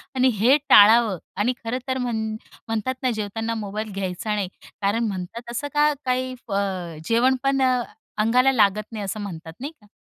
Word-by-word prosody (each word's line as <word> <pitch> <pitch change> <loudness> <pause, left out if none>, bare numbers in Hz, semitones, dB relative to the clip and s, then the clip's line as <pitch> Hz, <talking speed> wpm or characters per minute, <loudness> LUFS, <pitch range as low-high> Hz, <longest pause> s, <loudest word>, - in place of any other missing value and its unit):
आणि 260 0 +4
हे 255 +7 +6
टाळावं. 215 -1 +7 0.2
आणि 225 +6 +1
खरं 230 +3 -2
तर 260 0 0
म्हण 235 -3 -1 0.4
म्हणतात 225 +3 -1
ना, 255 - +2
जेवताना 225 +1 -3
मोबाईल 210 +1 -4
घ्यायचा 195 +2 -2
नाही 200 -3 -1 0.3
कारण 205 +4 +1
म्हणतात 210 +5 -6
असं 290 +5 -3
का 295 0 +4
काही 255 0 0 0.2
अ, 190 -5 -2
जेवणपण 260 +3 +2 0.6
अंगाला 250 +5 +4
लागत 215 -2 +2
नाही, 215 -2 -5
असं 200 +3 -4
म्हणतात, 165 -4 -7
नाही 285 +4 -5
का? 210 - -21
225 Hz, 160 wpm, -23 LUFS, 200-255 Hz, 0.6 s, टाळावं